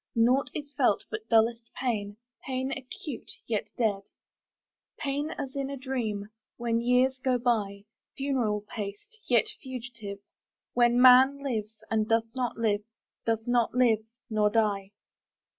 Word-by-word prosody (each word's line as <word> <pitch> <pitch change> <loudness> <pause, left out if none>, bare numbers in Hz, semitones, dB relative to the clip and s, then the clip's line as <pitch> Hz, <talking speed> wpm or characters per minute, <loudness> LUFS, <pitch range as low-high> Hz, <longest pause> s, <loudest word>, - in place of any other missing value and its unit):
Naught 250 +3 +3
is 290 -1 -6
felt 275 -3 +2
but 430 +1 -5
dullest 230 0 +3
pain, 210 -5 -2 0.3
Pain 260 0 -1
acute, 270 0 -6
yet 220 -3 -1
dead; 210 -4 +1 1.0
Pain 285 +1 -2
as 275 0 -5
in 275 -1 -2
a 280 - -4
dream, 230 -6 -3 0.3
When 235 -1 0
years 250 +2 +3
go 255 -1 +2
byFuneral 215 +1 -2
paced, 210 - -7
yet - - +4
fugitive, 245 - -7 0.6
When 240 0 +4
man 260 +2 +7
lives, 220 -5 -3
and 215 -1 +1
doth 225 0 +1
not 250 -3 -2
live, 215 -3 +1 0.5
Doth 225 0 +1
not 245 -1 +2
live—nor 225 -2 +1
die. 205 -3 +1
240 Hz, 125 wpm, -28 LUFS, 215-260 Hz, 1.0 s, man